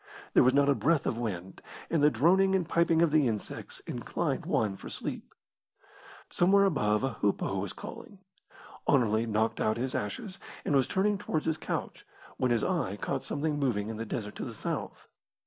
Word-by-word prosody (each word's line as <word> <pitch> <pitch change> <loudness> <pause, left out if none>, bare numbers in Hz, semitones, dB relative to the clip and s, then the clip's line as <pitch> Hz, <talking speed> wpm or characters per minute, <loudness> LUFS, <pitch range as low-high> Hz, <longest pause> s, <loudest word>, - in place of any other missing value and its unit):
There - - +7
was 130 +2 +4
not 140 0 +4
a 140 - +5
breath 140 +5 +1
of 115 - -1
wind, 95 -5 -5 0.3
and 165 - +2
the 150 - +6
droning 185 +10 +4
and 180 -4 0
piping 170 -1 +3
of 165 - +3
the 150 -3 +4
insects 110 -3 -4
inclined - - -3
one 105 -3 +1
for - - -9
sleep. - - -5 0.9
Somewhere 195 +3 +4
above 105 - +1
a 135 - 0
hoopoe 100 -1 0
was 95 -1 -3
calling. 200 - -9 0.7
Anerley 115 -4 +3
knocked 110 +1 0
out 110 +1 +1
his 130 +2 -2
ashes, 185 - -4 0.3
and 145 - +1
was 135 -2 +3
turning 200 +1 +1
towards 155 -6 -2
his 160 -1 0
couch, - - -4 0.3
when 130 - +1
his 120 -2 +2
eye 170 - 0
caught - - -3
something 150 0 -2
moving 110 -7 0
in 110 - -5
the 115 - -3
desert 105 -2 -4
to - - -4
the - - -6
south. - - -5
135 Hz, 185 wpm, -30 LUFS, 110-165 Hz, 0.9 s, There